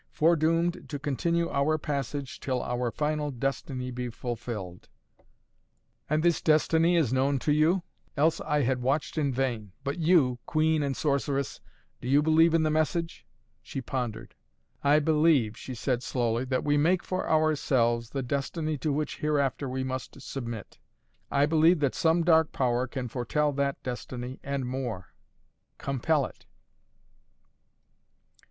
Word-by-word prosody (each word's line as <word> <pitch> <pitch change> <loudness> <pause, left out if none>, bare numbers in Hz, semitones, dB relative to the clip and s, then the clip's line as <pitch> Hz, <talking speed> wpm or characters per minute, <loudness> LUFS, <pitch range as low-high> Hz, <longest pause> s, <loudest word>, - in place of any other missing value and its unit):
"Foredoomed 165 +2 +1
to 145 - -3
continue 170 +5 0
our 140 +3 +2
passage 140 -2 -4
till 130 -2 -2
our 125 0 -1
final 150 +3 -1
destiny 130 0 -3
be 125 0 -4
fulfilled." 115 -6 -6 1.2
"And 155 +1 +1
this 170 -1 +3
destiny 160 +2 +3
is 145 -8 +2
known 135 +2 +2
to 150 - 0
you?" 160 +5 +3 0.3
"Else 155 +3 +2
I 150 -2 +1
had 125 0 0
watched 135 +4 0
in 145 -4 +1
vain. 120 -6 -2
But 140 +5 -3
you 155 -7 +3
queen 155 -1 +2
and 140 -2 -1
sorceress 140 -1 -1 0.4
do - - -6
you 140 +3 +4
believe 160 +1 +5
in 165 - +3
the 155 - +1
message?" 155 +2 -1 0.3
She - - -6
pondered. 120 -3 -4 0.5
"I 145 +1 +5
believe," 150 -7 +3
she 130 - -7
said 125 +1 -1
slowly, 120 -1 -1
"that 130 0 -1
we 145 0 +2
make 170 +5 +2
for 185 - -3
ourselves 130 -7 +2
the 135 0 -3
destiny 145 +4 -2
to 150 +3 -1
which 150 +1 -2
hereafter 140 -3 0
we 130 +1 -2
must 130 +1 -5
submit. 120 -5 -7 0.5
I 140 +1 +3
believe 160 +2 +4
that 140 -3 +2
some 165 +4 +2
dark 160 -2 +4
power 125 -1 0
can 130 -1 -4
foretell 135 +5 0
that 140 0 -1
destiny, 125 0 -5
and 140 -1 -3
more 125 -8 -4 0.6
compel 140 +2 0
it!" - - -12
140 Hz, 145 wpm, -28 LUFS, 125-155 Hz, 1.2 s, believe